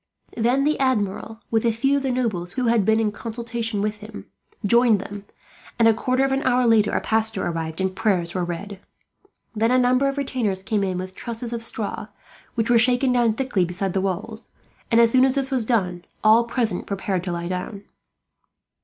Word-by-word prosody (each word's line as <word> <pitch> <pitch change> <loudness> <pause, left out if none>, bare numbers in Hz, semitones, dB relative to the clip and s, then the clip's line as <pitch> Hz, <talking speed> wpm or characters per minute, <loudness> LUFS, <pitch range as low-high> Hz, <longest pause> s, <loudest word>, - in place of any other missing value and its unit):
Then 245 +4 +2
the 305 +2 +1
Admiral, 225 -3 -1
with 225 -1 +2
a 235 - +3
few 270 +5 +1
of - - -1
the 270 - -1
nobles 205 -8 -2
who 255 -1 -1
had 230 -2 +3
been 220 +1 +3
in 215 -2 +1
consultation 225 -1 -4
with 210 0 -2
him, 210 0 -10 0.4
joined 235 0 +4
them 200 +1 -8 0.5
and, 230 -1 +5
a 225 - +6
quarter 255 +4 0
of 270 - -1
an 270 0 +1
hour 255 -1 +2
later, 225 -3 +4
a - - 0
pastor 220 0 0
entered 165 -1 -3
and 190 0 -1
prayers 185 -5 0
were 185 - -1
read. 185 +3 -6 0.8
Then 225 +2 +2
a 255 - +3
number 255 +2 +3
of 275 - -5
retainers 235 -9 -2
came 205 0 0
in 185 -2 -1
with 185 +1 -6
trusses 235 +2 -5
of 230 - -3
straw, 220 -2 -4 0.5
which 225 0 0
were 235 - +6
shaken 250 +2 +3
down 240 -3 +3
thickly 250 -7 0
beside 180 +2 -3
the 190 - 0
walls; 195 +4 -4 0.4
and 230 - +4
as 230 -1 +5
soon 255 +1 +5
as 265 0 +3
this 275 -1 -1
was 255 -4 +1
done, 185 -7 0 0.2
all 220 +2 +5
present 230 -6 -2
prepared 190 -2 -2
to 180 - -2
lie 170 0 -3
down. 190 +3 -5
225 Hz, 205 wpm, -23 LUFS, 195-245 Hz, 0.8 s, a